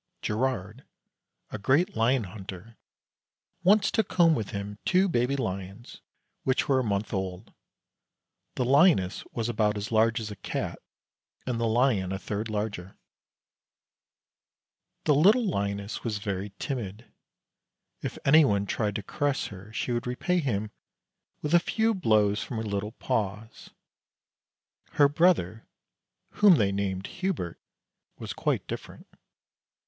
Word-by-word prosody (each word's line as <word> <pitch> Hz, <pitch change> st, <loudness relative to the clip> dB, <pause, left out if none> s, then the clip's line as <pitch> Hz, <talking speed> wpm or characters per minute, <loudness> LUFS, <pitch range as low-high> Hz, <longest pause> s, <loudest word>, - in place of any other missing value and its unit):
Girard, 110 Hz, 0 st, -2 dB, 0.7 s
a 110 Hz, -, -5 dB
great 140 Hz, -, +2 dB
lion 115 Hz, +2 st, +2 dB
hunter, 95 Hz, +2 st, -9 dB, 0.9 s
once 200 Hz, +3 st, +4 dB
took 220 Hz, -, 0 dB
home 170 Hz, -3 st, +5 dB
with 110 Hz, -9 st, -2 dB
him 100 Hz, +1 st, -6 dB
two 190 Hz, +1 st, +3 dB
baby 130 Hz, -5 st, +1 dB
lions 100 Hz, -2 st, -5 dB, 0.4 s
which 130 Hz, 0 st, 0 dB
were 135 Hz, -2 st, +3 dB
a -, -, 0 dB
month 105 Hz, -1 st, -2 dB
old. 95 Hz, 0 st, -4 dB, 1.0 s
The 125 Hz, -, 0 dB
lioness 135 Hz, -, +4 dB
was 115 Hz, -1 st, -2 dB
about 105 Hz, -3 st, +1 dB
as 105 Hz, +2 st, -5 dB
large 115 Hz, +1 st, +3 dB
as 110 Hz, -2 st, -5 dB
a -, -, -6 dB
cat -, -, -4 dB, 0.7 s
and 125 Hz, -2 st, -2 dB
the 115 Hz, -, +1 dB
lion 110 Hz, -5 st, +2 dB
a 95 Hz, -, -2 dB
third 105 Hz, +3 st, -4 dB
larger. 105 Hz, -3 st, -4 dB, 2.1 s
The 150 Hz, -, +4 dB
little 205 Hz, -, +5 dB
lioness 100 Hz, -, -2 dB
was 110 Hz, -3 st, -2 dB
very 100 Hz, -1 st, -4 dB
timid. 115 Hz, -4 st, -5 dB, 1.0 s
If -, -, -5 dB
anyone 135 Hz, -9 st, +5 dB
tried 105 Hz, 0 st, -1 dB
to 105 Hz, -, -3 dB
caress 145 Hz, +6 st, -1 dB
her 100 Hz, +1 st, -11 dB
she 110 Hz, +3 st, -3 dB
would 120 Hz, +1 st, -2 dB
repay 180 Hz, +9 st, 0 dB
him 110 Hz, -8 st, -2 dB, 0.7 s
with 150 Hz, +2 st, -1 dB
a 175 Hz, -, +8 dB
few 225 Hz, +5 st, +1 dB
blows 105 Hz, -, +2 dB
from 120 Hz, -, -5 dB
her 110 Hz, -, -2 dB
little 105 Hz, 0 st, -3 dB
paws. 110 Hz, -4 st, -3 dB, 1.2 s
Her 145 Hz, -, +6 dB
brother, 145 Hz, -, +2 dB, 0.7 s
whom 205 Hz, -4 st, +7 dB
they 100 Hz, -8 st, +2 dB
named 95 Hz, -1 st, -2 dB
Hubert, 180 Hz, -, -3 dB, 0.6 s
was -, -, -6 dB
quite -, -, -1 dB
different. -, -, -8 dB
110 Hz, 135 wpm, -27 LUFS, 100-140 Hz, 2.1 s, a